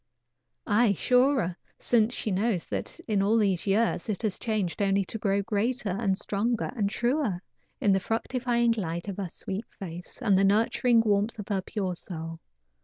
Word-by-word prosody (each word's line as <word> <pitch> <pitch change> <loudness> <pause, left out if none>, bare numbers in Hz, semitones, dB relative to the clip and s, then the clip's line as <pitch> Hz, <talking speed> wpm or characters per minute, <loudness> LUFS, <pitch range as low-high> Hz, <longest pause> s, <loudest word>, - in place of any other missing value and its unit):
Aye, 215 0 +3
surer, 250 - +2 0.2
since 230 -1 +2
she 215 - -2
knows 195 -1 0
that - - -4
in 210 -3 0
all 210 +3 +3
these 195 -4 +1
years 205 -1 +1
it 210 +1 -2
has 210 -3 -1
changed 210 -5 -1
only 195 -1 +2
to 220 - -6
grow 200 -1 +1
greater 225 +2 -1
and 195 0 0
stronger 220 +3 -1
and 205 -4 0
truer 240 - 0 0.4
in 205 - +3
the 195 - +4
fructifying 235 +3 0
light 175 -5 -3
of 200 - -4
her 195 -3 -3
sweet 195 +6 -5
face, 175 -2 -9
and 195 -3 +3
the - - +3
nurturing 225 +3 +3
warmth 210 +1 +1
of 210 -1 -7
her 195 -2 0
pure 190 -2 -3
soul. 165 -2 -7
205 Hz, 175 wpm, -27 LUFS, 195-230 Hz, 0.4 s, the